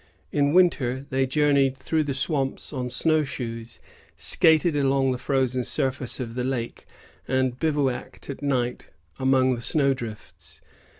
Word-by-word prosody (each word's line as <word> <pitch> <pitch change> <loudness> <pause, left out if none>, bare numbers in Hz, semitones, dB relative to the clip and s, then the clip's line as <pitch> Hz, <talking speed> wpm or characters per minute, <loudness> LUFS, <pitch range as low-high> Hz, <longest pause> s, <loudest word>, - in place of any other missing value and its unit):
In 145 -1 +2
winter, 140 -7 +2
they 130 0 +1
journeyed 140 -1 +2
through 155 +1 -1
the 140 -2 -2
swamps 135 0 -2
on 125 -2 -3
snowshoes, 125 -5 -2 0.4
skated 160 -1 +3
along 135 -1 +2
the 125 - -3
frozen 130 -2 0
surface 130 0 -2
of 115 -3 -5
the 125 +1 -3
lake, 125 -2 -4 0.4
and 130 -1 0
bivouacked 145 -5 -2
at 140 - -7
night 125 -4 -1 0.3
among 130 -1 +3
the 120 - -5
snow 140 +1 +3
drifts. 115 -5 -9
135 Hz, 135 wpm, -25 LUFS, 125-145 Hz, 0.4 s, skated